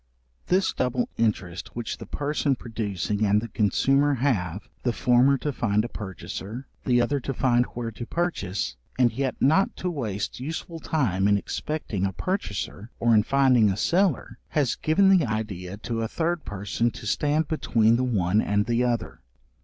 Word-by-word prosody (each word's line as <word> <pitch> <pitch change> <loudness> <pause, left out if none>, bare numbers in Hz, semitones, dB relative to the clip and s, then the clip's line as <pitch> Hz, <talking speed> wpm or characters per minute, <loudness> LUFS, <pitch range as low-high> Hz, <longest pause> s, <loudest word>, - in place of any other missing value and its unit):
This 190 +2 +2
double 125 -1 -1
interest 100 -6 -2
which 120 -2 -4
the - - -9
person 145 -1 0
producing 105 -4 -3
and 105 0 +4
the 115 +2 -6
consumer 135 +8 +2
have, 105 - -1
the 120 - 0
former 125 +4 +4
to 145 +3 -2
find 110 -3 +1
a - - -5
purchaser, 100 - -7 0.2
the 125 -1 +3
other 140 +4 +1
to 135 +1 -4
find 120 -1 +3
where 115 -1 -3
to 120 +2 -7
purchase, 105 - -2 0.2
and 125 -2 +3
yet 130 +1 -2
not 160 +8 +3
to 180 - -3
waste 110 - -3
useful 165 +4 -5
time 100 - +1
in 100 0 +4
expecting 115 -3 -3
a 95 - -5
purchaser, 120 - -3
or 115 0 +3
in 110 - +6
finding 130 -3 +4
a 95 - -1
seller, 170 - +1
has 145 -5 +1
given 195 +5 +4
the 165 -8 +2
idea 100 -4 -4
to 115 +1 -3
a 115 - -1
third 170 +5 -1
person 105 +4 -1
to 110 - -10
stand 150 +8 +1
between 115 -7 +2
the 125 - +1
one 105 -4 +2
and 105 0 +1
the 120 +1 +1
other. 120 -1 -1
120 Hz, 170 wpm, -25 LUFS, 105-140 Hz, 0.2 s, in